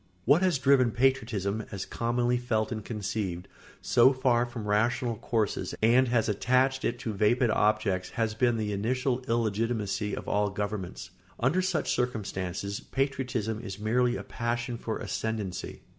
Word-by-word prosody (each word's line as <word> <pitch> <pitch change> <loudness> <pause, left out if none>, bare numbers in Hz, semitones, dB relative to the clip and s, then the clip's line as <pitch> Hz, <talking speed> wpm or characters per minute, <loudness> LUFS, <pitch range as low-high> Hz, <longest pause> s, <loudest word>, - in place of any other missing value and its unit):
] 90 - -35
What 145 +7 +5
has 185 -5 +3
driven 130 -2 +4
patriotism, 110 -5 0
as 95 -2 -4
commonly 120 +1 0
felt 110 -2 -1
and 110 -2 -4
conceived, 100 -4 -3 0.4
so 125 +3 +5
far 125 -2 +2
from 120 -3 -6
rational 115 +3 +1
courses 110 0 -1
and 120 +4 +4
has 115 -2 +2
attached 130 +5 +2
it 120 - 0
to 110 - -3
vapid 110 +4 +2
objects 105 -4 +1
has 110 -2 +1
been 120 +1 +2
the 105 -1 -2
initial 125 +5 0
illegitimacy 110 -2 -1
of - - -7
all 105 0 +1
governments. 100 -2 -4 0.3
Under 145 +10 +2
such 185 -4 0
circumstances, 100 -5 -2
patriotism 130 -5 -2
is 100 -5 -6
merely 120 +3 +1
a - - -5
passion 120 0 -3
for 115 -1 -4
ascendency. 110 -5 -4
115 Hz, 150 wpm, -28 LUFS, 105-125 Hz, 0.4 s, What